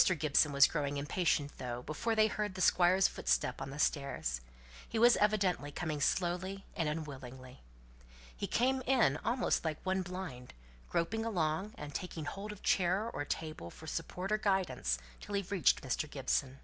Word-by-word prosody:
Gibson 150 0 +3
was 140 0 +7
growing 145 -3 -1
impatient 145 0 0
though, 125 -1 -4
before 225 - -1
they 215 0 +5
heard 210 -2 -2
the 185 - -4
Squire's 185 +1 +5
footstep 125 - 0
on 135 - -4
the 140 - -7
stairs; 140 - 0 0.5
he 225 - -2
was 240 +2 +7
evidently 195 -8 +1
coming 155 -2 -3
slowly 185 +4 0
and 160 -2 0
unwillingly. 130 -5 -7 0.7
He - - -3
came 260 +2 +2
in 235 - +4
almost 245 +6 0
like 155 -2 -1
one 190 0 +1
blind, 180 - -7 0.3
groping 225 +7 0
along, 190 -2 -1
and 145 -1 -7
taking 165 -3 -5
hold 200 +7 -5
of 210 - -11
chair 190 +5 +2
or 145 - -3
table 155 - -4
for 160 - -12
support 180 +5 -4
or 215 - +2
guidance 180 - +1 0.2
till 205 - -5
he 200 - +1
reached 190 -2 +2
Mr. 135 +3 -1
Gibson. 135 -1 -1
165 Hz, 165 wpm, -33 LUFS, 145-195 Hz, 0.7 s, was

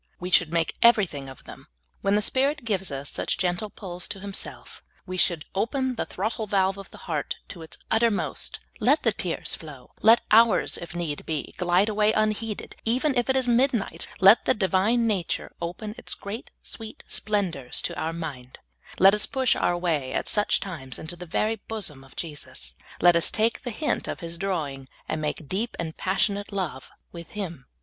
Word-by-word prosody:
We 180 +1 -5
should 175 -3 +5
make 165 -1 +1
everything 190 - +4
of 130 - -12
them. - - -12 0.3
When 200 +1 +2
the 210 - +2
Spirit 275 +3 +1
gives 195 -6 0
us 140 0 -3
such - - 0
gentle 180 +3 0
pulls 180 -4 -6
to 195 - -5
Himself, 200 0 -5 0.2
we 185 -1 -5
should 175 -4 +2
open 260 +6 0
the 235 - -3
throttle 215 +3 -2
valve 195 -1 +2
of 195 - -9
the - - -12
heart 155 -5 -2
to 175 - -8
its 160 - -7
utter 230 +1 +4
most; 205 - -2 0.2
let 270 +7 +3
the 225 - +4
tears 180 -4 -1
flow; 145 -6 -8
let 225 +2 +7
hours, 225 +1 +5
if 170 0 -8
need 165 -4 -3
be, 155 -3 -3
glide 180 +3 +3
away 215 0 +3
unheeded, 215 0 -1
even 260 +5 +2
if 245 +1 +1
it 265 - +3
is 260 -1 +2
midnight; 240 -2 +2
let 195 +4 +7
the - - +3
Divine 210 +4 +2
nature 200 -6 -1
open 180 +5 -4
its - - -3
great, 205 +5 -7
sweet 220 -2 -8
splendors 180 -12 0
to - - -2
our 160 - -2
mind; 145 -7 -6 0.4
let 195 +1 +7
us 210 - +1
push 260 -2 +2
our 175 - +1
way 155 -7 -1
at - - -1
such 210 -1 +2
times 145 -9 -4
into 165 +2 -6
the 180 0 -9
very 215 +7 0
bosom 175 -12 -3
of 135 - -18
Jesus; 145 - -6 0.3
let 175 0 +7
us 170 - +5
take 225 +2 +2
the 245 - -4
hint 295 +7 -1
of - - -4
His 170 0 -3
drawing, 150 -9 -3 0.2
and 155 - -2
make 150 0 -3
deep 210 +9 -2
and 160 -2 -4
passionate 200 +2 0
love 180 -9 -3 0.2
with 170 -1 -9
Him. 170 -10 -5
190 Hz, 190 wpm, -26 LUFS, 165-220 Hz, 0.4 s, let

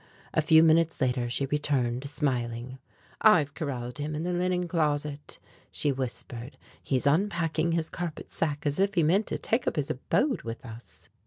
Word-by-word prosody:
A - - +3
few 160 +1 +6
minutes 165 0 +3
later 125 -2 0
she 125 +3 0
returned, 135 -3 0
smiling: 125 -3 -2 0.4
"I've 160 -10 +5
corralled 125 -5 -4
him 150 +1 -3
in 155 - -3
the 180 +1 -1
linen 180 0 0
closet," 150 -3 -1 0.3
she 145 - +1
whispered; 125 -1 -5 0.2
"he 135 - -1
is 130 - 0
unpacking 165 0 +1
his 165 -1 -1
carpet 175 -3 -5
sack 150 -3 -1
as 145 +2 0
if 195 +1 +2
he 170 - +4
meant 190 +8 +3
to - - -2
take 230 +3 -1
up - - +1
his 145 -2 -1
abode 260 - 0
with 115 +2 -7
us." 115 0 -11
150 Hz, 175 wpm, -28 LUFS, 130-165 Hz, 0.4 s, few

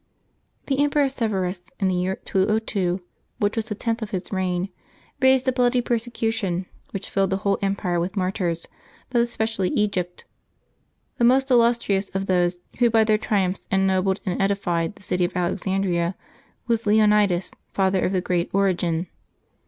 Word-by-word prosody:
^<HE 270 -1 0
Emperor 290 0 +3
Severus, 200 -8 -1 0.2
in 195 - +2
the 185 - +1
year 180 +1 0
202, 195 -3 0 0.3
which 205 0 0
was 225 -2 -1
the 215 -2 -4
^y - - -27
tenth 230 0 -1
of 220 - -4
his 190 -2 -4
reign, 185 -1 -1 0.5
raised 260 0 +4
a - - +5
blood)^ 245 -1 +2
persecution, 225 -6 -1 0.2
which 195 - -5
filled 195 -1 +2
the 190 - 0
whole 200 -1 +2
empire 195 -3 0
with 180 +4 -3
martyrs, 185 -3 -1 0.5
but 240 -2 +3
especially 225 -5 -1
Egypt. 180 -4 -1 0.9
The - - +2
most 265 +3 +4
illustrious 235 -5 +3
of 195 0 0
those 180 -1 +1 0.2
who 240 -1 +5
by 225 -1 +4
their 215 -1 +2
triumphs 195 -3 -1
en 190 0 +2
nobled 190 0 +1
and 185 +1 -1
edified 195 -3 0
the - - -14
city 180 -1 0
of 175 - -1
Alexandria 180 -1 0 0.5
was 230 -1 0
Leonides, 210 -4 +3 0.2
father 190 -1 +1
of - - +1
the 185 -2 +1
great 175 -1 0
Origen. 180 -4 +1
195 Hz, 160 wpm, -23 LUFS, 185-225 Hz, 0.9 s, a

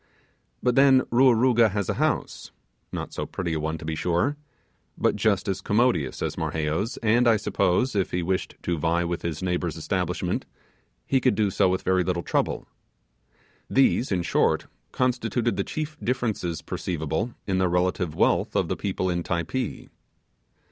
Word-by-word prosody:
But 125 - +3
then, 135 0 +6
Ruaruga 120 -2 +5
has 100 -2 -2
a - - 0
house - - -1 0.4
not - - -5
so - - -4
pretty 85 -3 -3
a 80 - -1
one, 80 +1 -2
to 80 - -9
be 80 - -2
sure 90 - 0 0.6
but - - +2
just 105 -1 +1
as 95 -1 -1
commodious 105 - +1
as - - -3
Marheyo's; 80 +9 -2
and, 115 +3 +4
I 115 -2 +5
suppose, 100 +4 +1
if 95 -2 +1
he 90 0 -1
wished 95 +2 -2
to 85 -2 -1
vie 85 +2 +1
with 85 0 -3
his 85 0 -4
neighbour's 90 -3 -1
establishment, 90 +1 -2 0.6
he 135 -1 +2
could 130 0 +3
do 105 -3 +1
so 95 0 +3
with 95 0 -1
very 95 -1 +2
little 85 -1 -1
trouble. - - -1 1.0
These, 135 -2 +3
in 90 -3 +1
short, - - +1 0.3
constituted 120 -2 0
the - - 0
chief 155 0 -4
differences 110 -9 -2
perceivable 85 +7 -3
in 95 -2 0
the 95 -1 +2
relative 90 -2 0
wealth - - +2
of - - +1
the - - 0
people 95 -2 -2
in 85 -1 0
Typee. 85 +10 -3
95 Hz, 165 wpm, -25 LUFS, 85-120 Hz, 1.0 s, then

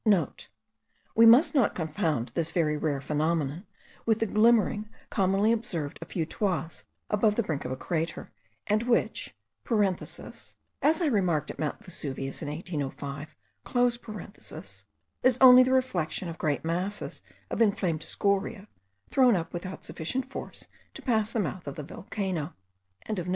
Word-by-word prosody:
(* - - -43
We 230 +1 +8
must 275 +7 +7
not 265 -8 +3
confound 155 - -1
this 160 +6 -1
very 160 -3 +1
rare 150 -2 -1
phenomenon 155 +3 -1 0.4
with 225 -2 +3
the 225 - +1
glimmering 215 -1 +3 0.2
commonly 195 +2 +3
observed 185 -11 -2
a - - -5
few 165 -4 -2
toises 170 -2 -2 0.3
above 210 0 +3
the 235 - +1
brink 155 -7 -3
of - - -3
a 130 - -3
crater, 165 +2 -3 0.3
and 210 +1 +2
which 240 0 0 0.3
(as 205 -6 -2 0.3
I 320 +3 +3
remarked 180 - +1
at - - -13
Mount 155 +8 -3
Vesuvius 135 -6 -5
in 150 - -3
1805) 145 -2 -5 1.9
is 255 -1 +4
only 255 -1 +10
the 255 +1 +3
reflection 190 -9 0
of 165 - -8
great 155 -2 0
masses 180 +5 -2 0.3
of - - -1
inflamed 185 -7 +2
scoria, 200 +4 -1 0.4
thrown 255 -4 +5
up 165 -3 -3
without 185 +2 -6
sufficient 255 +11 -3
force - - -7 0.3
to - - -9
pass 220 -4 +1
the 230 - -1
mouth 175 -3 -3
of 140 - -4
the 150 - -5
volcano.) 180 -1 -4
185 Hz, 140 wpm, -28 LUFS, 155-220 Hz, 1.9 s, only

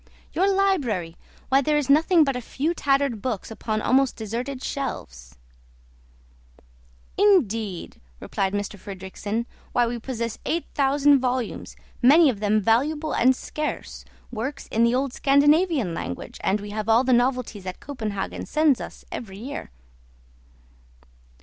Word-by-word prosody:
"Your 385 +3 +2
library! 270 - 0 0.3
why 270 +1 +4
there 300 +2 +1
is 295 - 0
nothing 320 +4 +5
but 275 -3 0
a 250 - -3
few 290 +7 -2
tattered 275 -7 +1
books 225 -3 -3
upon 215 -1 -3
almost 265 0 +3
deserted 245 +5 -5
shelves." 60 - -5 1.8
"Indeed!" 230 - +1 0.2
replied 195 0 -2
M. 205 - 0
Fridrikssen, 205 +3 -5 0.3
"why 245 -1 +3
we 235 0 -3
possess 235 -1 -4
eight 335 +1 -1
thousand 280 0 +4
volumes, 250 -2 -3 0.3
many 285 +4 +7
of 210 - -8
them 210 +1 +2
valuable 295 +9 +1
and 255 +2 +4
scarce, 300 +4 -5 0.3
works 260 +5 -4
in 225 - +2
the 235 +1 +3
old 265 -1 -1
Scandinavian 290 - +3
language, 90 - -6
and 200 +2 +1
we 205 0 -7
have 215 +1 -3
all 230 +3 +5
the 260 -1 +2
novelties 245 -5 0
that 185 -1 -6
Copenhagen 220 -8 -5
sends 305 -5 +2
us - - -9
every 195 -5 -7
year." 255 +7 -6
250 Hz, 135 wpm, -24 LUFS, 215-280 Hz, 1.8 s, many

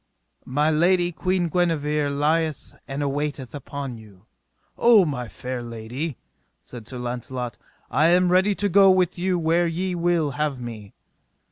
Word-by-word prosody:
My 150 +4 +1
lady, 175 +3 +3
Queen 180 +1 0
Guenever, 150 -4 0
lieth 155 +2 0
and 140 +1 -3
awaiteth 140 -2 -3
upon 140 -3 -6
you. 105 -3 -17 0.5
O 230 -5 +6
my 130 -6 -3
fair 125 +2 -6
lady, 120 +5 -5 0.5
said 115 -3 -11
Sir 130 - -6
Launcelot, 125 -2 -5 0.3
I 150 +6 +4
am 180 +1 +4
ready 190 +3 +3
to 205 - 0
go 195 +1 +6
with 185 -2 +2
you 185 0 +1
where 170 +1 +2
ye 180 +3 -2
will 170 -3 +1
have 145 -1 -2
me. 110 -4 -8
150 Hz, 145 wpm, -24 LUFS, 125-175 Hz, 0.5 s, O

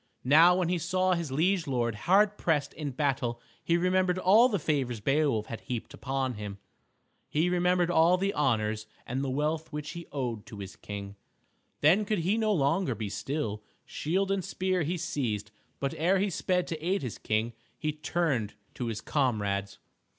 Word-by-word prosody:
Now 160 +7 +7
when 180 -2 +1
he 180 -1 +1
saw 185 +2 +1
his 170 -5 -2
liege 170 +4 +1
lord 120 -4 0
hard 195 - +3
pressed 150 -7 0
in 150 -2 -4
battle 125 -4 -1 0.2
he 170 - +2
remembered 185 +1 +2
all 215 +7 +6
the 205 - +1
favors 135 - -1
Beowulf 135 -2 +1
had 115 -2 -7
heaped 120 -3 -5
upon 135 -1 -2
him. 105 -2 -6 0.7
He 165 +4 +1
remembered 180 0 +2
all 170 +2 +5
the 195 +2 0
honors 110 -6 0 0.2
and 130 +3 -2
the 135 - -1
wealth 155 +4 -1
which 150 -1 -5
he 170 -1 -8
owed 120 -6 -3
to 110 -3 -9
his 95 -1 -8
King. 100 -1 -7 0.6
Then 180 +8 +5
could 215 +1 0
he 195 +4 +3
no 220 -1 +1
longer 150 - +1
be 105 -1 -4
still. 110 -3 -3 0.2
Shield 190 +5 -1
and 195 -1 0
spear 185 -1 -1
he 170 +4 -1
seized, 110 -10 -2 0.3
but 140 -1 -1
ere 180 +5 +2
he 195 +1 0
sped 180 +1 0
to 160 -2 -5
aid 185 -1 0
his 125 - -5
King 110 +2 -1 0.2
he 155 - -1
turned 150 -8 -1 0.2
to 125 - -4
his 110 -2 -3
comrades. 100 -8 -1
150 Hz, 180 wpm, -29 LUFS, 120-180 Hz, 0.7 s, Now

